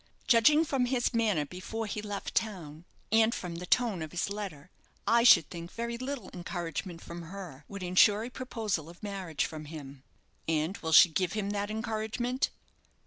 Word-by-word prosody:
"Judging 295 +7 +5
from 265 -4 +1
his 245 -1 +1
manner 210 -10 +2
before 185 +8 -5
he 210 0 -4
left 205 -1 -5
town, 170 -7 -3 0.3
and 220 +1 +4
from 180 -2 -5
the 180 +1 -7
tone 225 -7 +2
of 155 - -4
his 175 +3 -2
letter, 185 -6 -6 0.3
I 235 +1 +4
should 195 -10 +8
think 170 0 -7
very 235 0 -3
little 260 +2 -5
encouragement 175 -1 -5
from 170 0 -7
her 170 -5 -9
would 200 -2 -7
ensure 200 +4 +5
a 245 - -6
proposal 215 - -3
of 175 +4 -15
marriage 190 -6 -2
from 155 -1 -7
him." 145 -3 -9 0.5
"And 160 +3 0
will 160 - -3
she 160 - +9
give 175 +2 -1
him 205 -2 -2
that 205 0 -2
encouragement?" 220 +3 -1
200 Hz, 175 wpm, -30 LUFS, 170-225 Hz, 0.5 s, she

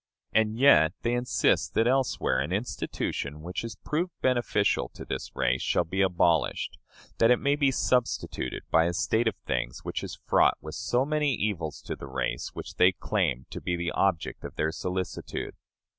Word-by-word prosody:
And 110 +1 +2
yet 85 - +6
they 120 - +1
insist 120 +1 +1
that 115 - +3
elsewhere 130 - +1
an 70 +5 -2
institution 75 - -3
which 90 +2 -4
has 115 -1 -6
proved 170 +4 -2
beneficial 120 -5 +1
to - - -8
this 65 - -5
race 60 +1 +1
shall - - +2
be 95 +4 -2
abolished, 85 -4 +1 0.4
that 115 - +5
it 125 - +6
may 140 +3 +1
be 145 -2 +3
substituted 125 - -1
by 80 0 +5
a 85 - 0
state 110 +6 +1
of 110 - 0
things - - -3
which - - -3
is - - -6
fraught - - +4
with 75 0 -8
so 125 +8 0
many 150 -2 +1
evils 85 -8 -3
to - - -4
the 70 - -9
race 65 0 -2
which - - -8
they 90 +1 +6
claim 80 - -1
to - - -6
be 90 - -1
the 85 0 -2
object 95 -5 0
of - - -7
their 80 +1 0
solicitude! 90 +2 -4
95 Hz, 180 wpm, -28 LUFS, 80-120 Hz, 0.4 s, yet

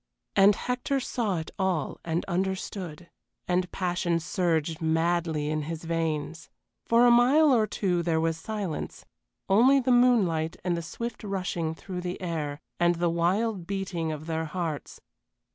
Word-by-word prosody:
And 200 +1 +6
Hector 250 +4 -1
saw 230 -7 -1
it 160 - -5
all 185 -6 -1
and 165 +1 -1
understood, 185 -2 -3 0.4
and 180 0 0
passion 175 -2 0
surged 165 -2 -1
madly 160 -1 0
in 155 0 -1
his 165 -1 -5
veins. 165 -1 -2 0.4
For 235 +1 +5
a 240 - +7
mile 270 +5 +5
or 220 -3 +3
two 180 -5 0
there 165 -1 +1
was 165 0 +1
silence 200 -4 -5 0.4
only 250 +8 +5
the 255 -1 +1
moonlight 200 -11 +3
and 180 -1 0
the 170 - -3
swift 235 +8 -6
rushing 180 -5 -2
through 180 +1 -6
the 180 0 -4
air, 155 -5 -3 0.2
and 175 0 +3
the 170 0 +1
wild 180 +3 0
beating 185 -5 -2
of 155 0 -6
their 160 0 -2
hearts. 160 -2 -4
175 Hz, 150 wpm, -27 LUFS, 165-200 Hz, 0.4 s, a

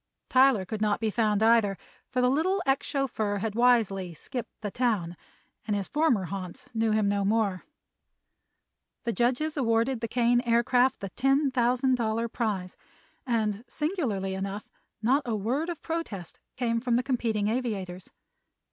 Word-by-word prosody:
Tyler 255 -6 +5
could 215 +3 -5
not 210 -1 +1
be 220 -1 0
found, 215 -1 +1
either, 220 -4 +4 0.3
for 255 - 0
the 250 - +4
little 360 +8 +1
ex 270 0 +1
chauffeur 245 -8 -1
had 210 +1 -2
wisely 215 -7 +2
"skipped 240 - -7
the 205 -2 -3
town" 205 -9 0 0.5
and 210 - +1
his 200 -2 -2
former 295 -10 +2
haunts 185 0 -7
knew 225 -1 +1
him 215 -1 +2
no 200 0 +1
more. 200 -2 0 1.4
The 235 - -1
judges 255 +7 0
awarded 230 -1 +1
the 230 - -1
Kane 240 +1 +2
Aircraft 245 +1 +2
the 195 - -4
ten 270 +5 +2
thousand 250 +1 +2
dollar 230 0 0
prize, 205 -6 -3 0.5
and 220 -3 0
singularly 255 - -2
enough 195 +2 -4 0.4
not 265 +6 +3
a 230 - 0
word 255 - -1
of 340 - -4
protest 320 - -5 0.2
came 230 -2 0
from 245 -1 +1
the 245 - +2
competing 230 -6 0
aviators. 205 -7 -3
230 Hz, 155 wpm, -28 LUFS, 205-255 Hz, 1.4 s, Tyler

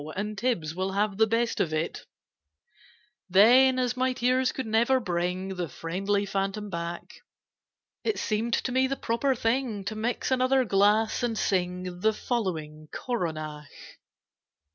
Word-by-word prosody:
[Picture: 155 +5 -6
And 210 +1 -3
Tibbs 195 -9 -1
will 190 +2 -2
have 200 0 0
the 220 0 +4
best 230 +1 0
of 160 - +1
it] 155 +1 -3 1.2
Then, 250 +8 +6
as 250 -1 0
my 255 0 +1
tears 255 +1 +1
could 265 - -4
never 235 +4 +3
bring 180 -2 -2
The 180 -4 -4
friendly 195 +7 -1
Phantom 195 +1 -3
back, 170 0 -6 0.8
It 440 - 0
seemed 225 +2 0
to 255 - -2
me 260 +1 +3
the 275 - -2
proper 260 +2 0
thing 230 -3 -1
To 215 - -3
mix 230 +4 -2
another 260 0 +3
glass, 210 +3 +3
and 235 -2 -1
sing 180 -2 -1
The 220 +3 +2
following 160 -11 -3
Coronach. 155 - -4
210 Hz, 145 wpm, -27 LUFS, 180-245 Hz, 1.2 s, Then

